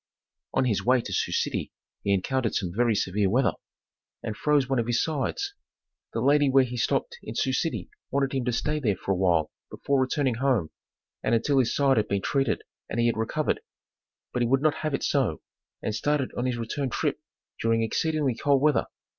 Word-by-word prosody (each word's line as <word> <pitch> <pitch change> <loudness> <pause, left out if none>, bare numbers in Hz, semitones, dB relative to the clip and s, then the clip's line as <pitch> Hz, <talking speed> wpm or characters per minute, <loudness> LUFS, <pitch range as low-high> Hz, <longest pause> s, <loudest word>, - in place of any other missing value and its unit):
On 130 - +3
his 110 -6 +1
way 130 +1 +4
to - - -6
Sioux - - 0
City - - -1 0.3
he 100 - 0
encountered 115 +5 0
some 90 -3 -1
very 120 -1 +3
severe 100 0 +1
weather, 120 -1 +3 0.7
and 110 - -3
froze 145 -1 +2
one 135 -2 +1
of 115 - -1
his 120 -1 +2
sides. 160 - -2 0.6
The 115 - -1
lady 145 +2 +4
where 135 0 +5
he 125 -1 -4
stopped 475 - -1
in - - -7
Sioux - - +1
City - - -1 0.2
wanted 140 -1 0
him 135 -2 0
to 125 - +1
stay 150 +6 0
there 110 -9 +1
for 95 - -4
a - - +3
while 85 -4 +2 0.2
before 140 -1 0
returning 130 0 +1
home, 125 - +1 0.5
and - - +2
until 135 +4 +2
his 120 -2 +1
side 135 -3 +3
had 110 - +2
been 100 -1 -1
treated 135 -4 0 0.3
and 115 - -2
he 120 - +3
had 120 - +2
recovered, 115 +7 0 0.7
but 125 - 0
he 120 - +3
would 135 +3 +2
not 155 -1 +3
have 155 -2 0
it - - -4
so, 130 - 0 0.4
and 110 - -1
started 140 +5 0
on 125 - -1
his 125 -2 -1
return 130 +4 -2
trip - - -1 0.4
during 115 0 +2
exceedingly 150 +3 0
cold 140 +3 +2
weather. 145 -2 +2
130 Hz, 205 wpm, -27 LUFS, 115-140 Hz, 0.7 s, where